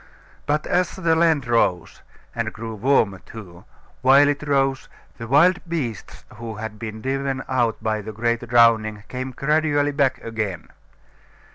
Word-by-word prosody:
But 150 Hz, +1 st, 0 dB
as 180 Hz, -1 st, 0 dB
the 165 Hz, -4 st, +1 dB
land 160 Hz, -4 st, +2 dB
rose, 115 Hz, -8 st, 0 dB, 0.3 s
and -, -, -3 dB
grew 115 Hz, 0 st, -7 dB
warmer 110 Hz, -4 st, +1 dB
too, 95 Hz, -3 st, -12 dB, 0.4 s
while 135 Hz, +3 st, +6 dB
it 145 Hz, -1 st, -1 dB
rose, 135 Hz, -1 st, 0 dB, 0.3 s
the 115 Hz, -, -6 dB
wild 170 Hz, +9 st, +4 dB
beasts 125 Hz, -, -5 dB
who 115 Hz, -1 st, -7 dB
had 110 Hz, 0 st, -7 dB
been 110 Hz, -1 st, -7 dB
driven 135 Hz, 0 st, -2 dB
out 120 Hz, -4 st, 0 dB
by 110 Hz, -1 st, -1 dB
the 110 Hz, +2 st, -7 dB
great 115 Hz, +2 st, -1 dB
drowning 110 Hz, -3 st, +3 dB
came 130 Hz, +1 st, -4 dB
gradually 145 Hz, +2 st, +1 dB
back 135 Hz, -2 st, +1 dB
again. 110 Hz, -6 st, -4 dB
125 Hz, 145 wpm, -22 LUFS, 110-140 Hz, 0.4 s, while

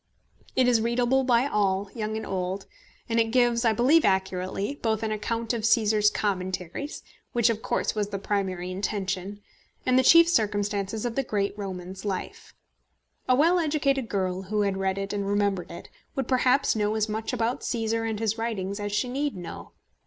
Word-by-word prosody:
It 255 Hz, -, +4 dB
is 235 Hz, -3 st, +4 dB
readable 245 Hz, +3 st, +2 dB
by 245 Hz, -1 st, +3 dB
all, 200 Hz, -7 st, +1 dB
old 200 Hz, +1 st, -7 dB
and 215 Hz, -1 st, -3 dB
young, 190 Hz, -3 st, -3 dB, 0.5 s
and 230 Hz, -1 st, +1 dB
it 225 Hz, -, +4 dB
gives, 240 Hz, 0 st, +3 dB
I 230 Hz, -, +4 dB
believe 260 Hz, +9 st, +4 dB
accurately, 190 Hz, +6 st, -1 dB
both 220 Hz, -1 st, 0 dB
an 220 Hz, -, -1 dB
account 230 Hz, +2 st, -2 dB
of 235 Hz, -, -2 dB
Cæsar's 215 Hz, -2 st, +4 dB
Commentaries, 185 Hz, -, -3 dB, 0.3 s
which 235 Hz, -1 st, +3 dB
of 220 Hz, -1 st, -4 dB
course -, -, -1 dB
was 210 Hz, -2 st, -2 dB
the 200 Hz, -, -3 dB
primary 190 Hz, -3 st, -2 dB
intention, 195 Hz, 0 st, -3 dB, 0.4 s
and 255 Hz, 0 st, +4 dB
the -, -, +3 dB
chief 335 Hz, +5 st, +8 dB
circumstances 205 Hz, -, 0 dB
of 240 Hz, -, -1 dB
the 275 Hz, -, +2 dB
great 205 Hz, -5 st, -1 dB
Roman's 190 Hz, -2 st, -6 dB
life. 195 Hz, -3 st, -5 dB, 0.7 s
A 255 Hz, -, +6 dB
well 335 Hz, +6 st, +4 dB
educated 280 Hz, -6 st, 0 dB
girl 185 Hz, -2 st, -1 dB
who 210 Hz, +2 st, -1 dB
had 200 Hz, -1 st, +1 dB
read 190 Hz, 0 st, -1 dB
it 195 Hz, +1 st, -3 dB
and 200 Hz, -1 st, -2 dB
remembered 200 Hz, -3 st, 0 dB
it 170 Hz, -, -9 dB, 0.3 s
would 270 Hz, -3 st, -2 dB
perhaps 255 Hz, +1 st, +3 dB
know 210 Hz, 0 st, 0 dB
as 215 Hz, 0 st, +1 dB
much 220 Hz, +1 st, -3 dB
about 240 Hz, 0 st, -1 dB
Cæsar 225 Hz, -1 st, -1 dB
and 215 Hz, -2 st, -3 dB
his 220 Hz, 0 st, -1 dB
writings 200 Hz, -3 st, -3 dB
as 205 Hz, 0 st, -3 dB
she 210 Hz, +5 st, 0 dB
need 280 Hz, +2 st, -2 dB
know. 175 Hz, -2 st, -8 dB
215 Hz, 180 wpm, -26 LUFS, 195-240 Hz, 0.7 s, chief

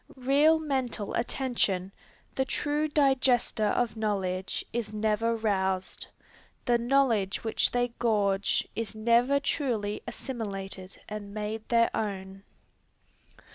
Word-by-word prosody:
Real 280 Hz, +5 st, +4 dB
mental 260 Hz, -8 st, -2 dB
attention, 230 Hz, -7 st, 0 dB, 0.4 s
the 265 Hz, -, +1 dB
true 295 Hz, +3 st, 0 dB
digester 265 Hz, -6 st, +2 dB
of 230 Hz, +2 st, 0 dB
knowledge, 190 Hz, -4 st, -2 dB
is 235 Hz, -3 st, -2 dB
never 215 Hz, +2 st, +1 dB
roused. 190 Hz, -4 st, -1 dB, 0.6 s
The 240 Hz, -1 st, +3 dB
knowledge 235 Hz, -6 st, +2 dB
which 225 Hz, -, +2 dB
they 245 Hz, 0 st, +1 dB
gorge, 205 Hz, -4 st, +1 dB
is 225 Hz, -1 st, -3 dB
never 235 Hz, +5 st, +3 dB
truly 230 Hz, -8 st, -1 dB
assimilated 195 Hz, -6 st, -6 dB
and 210 Hz, -1 st, -7 dB
made 215 Hz, +1 st, -4 dB
their 230 Hz, -1 st, +3 dB
own. 195 Hz, -2 st, -4 dB
225 Hz, 105 wpm, -28 LUFS, 200-255 Hz, 0.6 s, Real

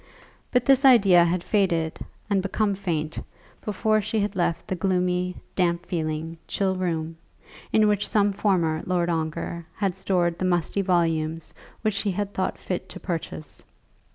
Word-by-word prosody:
But 250 Hz, -1 st, +2 dB
this 275 Hz, +1 st, +5 dB
idea 200 Hz, -10 st, +7 dB
had 175 Hz, +1 st, 0 dB
faded 170 Hz, -6 st, +1 dB, 0.3 s
and 200 Hz, -2 st, +2 dB
become 200 Hz, +2 st, 0 dB
faint, 160 Hz, -5 st, -3 dB, 0.4 s
before 215 Hz, +1 st, +1 dB
she 215 Hz, +2 st, -1 dB
had 205 Hz, 0 st, -1 dB
left 170 Hz, -2 st, -1 dB
the 185 Hz, -, -1 dB
gloomy, 180 Hz, 0 st, 0 dB, 0.2 s
damp 175 Hz, -1 st, +1 dB
feeling, 160 Hz, -1 st, -3 dB
chill 190 Hz, -1 st, 0 dB
room, 165 Hz, -3 st, -2 dB, 0.5 s
in 215 Hz, -1 st, +4 dB
which 205 Hz, -1 st, +1 dB
some 205 Hz, -1 st, +3 dB
former 170 Hz, -6 st, +1 dB
Lord 175 Hz, -1 st, +1 dB
Ongar 160 Hz, +1 st, -3 dB
had 195 Hz, -2 st, 0 dB
stored 180 Hz, -3 st, 0 dB
the 185 Hz, -, 0 dB
musty 180 Hz, +2 st, +1 dB
volumes 165 Hz, -3 st, 0 dB, 0.3 s
which 215 Hz, -3 st, +1 dB
he 205 Hz, -, -1 dB
had 205 Hz, +1 st, -3 dB
thought 185 Hz, -, -1 dB
fit 180 Hz, -, -4 dB
to -, -, -8 dB
purchase. 165 Hz, -3 st, -5 dB
180 Hz, 155 wpm, -25 LUFS, 170-200 Hz, 0.5 s, idea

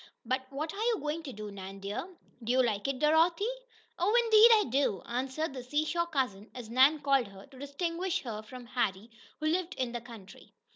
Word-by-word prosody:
"But 260 Hz, +2 st, -1 dB
what 305 Hz, +3 st, -4 dB
are 405 Hz, -, -5 dB
you 460 Hz, 0 st, +2 dB
going 300 Hz, +2 st, -3 dB
to 295 Hz, -4 st, -7 dB
do, 210 Hz, -2 st, -7 dB
Nan, 195 Hz, 0 st, -8 dB
dear? 205 Hz, -, -5 dB, 0.3 s
Do 230 Hz, -, -1 dB
you 255 Hz, +1 st, +4 dB
like 215 Hz, -1 st, -1 dB
it, 275 Hz, -1 st, -1 dB
Dorothy?" 325 Hz, +6 st, +3 dB, 0.5 s
"Oh! 415 Hz, +7 st, +4 dB
indeed 445 Hz, 0 st, +8 dB
I 425 Hz, -, +3 dB
do," 265 Hz, -8 st, +1 dB
answered 265 Hz, +5 st, -2 dB
the 260 Hz, -, -6 dB
"seashore 310 Hz, +6 st, -1 dB
cousin," 250 Hz, -10 st, -2 dB
as 235 Hz, -3 st, -8 dB
Nan 265 Hz, +5 st, +5 dB
called 275 Hz, -4 st, +2 dB
her 195 Hz, 0 st, -13 dB
to 270 Hz, -2 st, -16 dB
distinguish 335 Hz, +6 st, -2 dB
her 220 Hz, -4 st, -5 dB
from 245 Hz, +3 st, -11 dB
Harry, 225 Hz, -3 st, -2 dB, 0.3 s
who 310 Hz, -, -4 dB
lived 350 Hz, +3 st, 0 dB
in 255 Hz, -2 st, -2 dB
the 240 Hz, 0 st, -4 dB
country. 225 Hz, -5 st, -13 dB
265 Hz, 200 wpm, -30 LUFS, 235-325 Hz, 0.5 s, indeed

